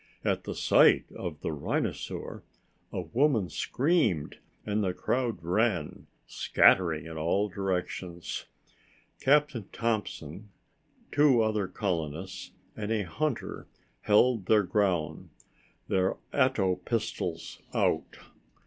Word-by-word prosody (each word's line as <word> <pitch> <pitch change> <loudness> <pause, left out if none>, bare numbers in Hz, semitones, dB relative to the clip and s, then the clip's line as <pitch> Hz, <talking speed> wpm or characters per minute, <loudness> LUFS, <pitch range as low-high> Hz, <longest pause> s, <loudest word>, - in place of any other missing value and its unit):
At - - 0
the - - -4
sight - - +4
of 80 -4 -6
the - - -2
rhinosaur, 75 -2 -3 0.5
a - - -2
woman 115 - +1
screamed 125 - 0 0.3
and 105 0 0
the 90 -2 -1
crowd 120 -8 -1
ran, 90 -2 0 0.2
scattering 85 -4 +3
in 80 -1 -6
all 95 +6 +1
directions. 90 -2 -3 0.7
Captain 145 -6 +2
Thompson, 105 -5 -3 0.6
two 140 -6 +5
other 105 -3 0
colonists 90 -2 -3 0.3
and 105 0 -4
a 110 -2 +1
hunter 145 - -3 0.3
held 110 -1 +3
their 105 -1 +5
ground, 90 -4 0 0.6
their 95 0 +1 0.2
ato 100 -9 +2
tube - - -25
pistols 115 -2 -3
out. - - 0
100 Hz, 105 wpm, -29 LUFS, 90-115 Hz, 0.7 s, two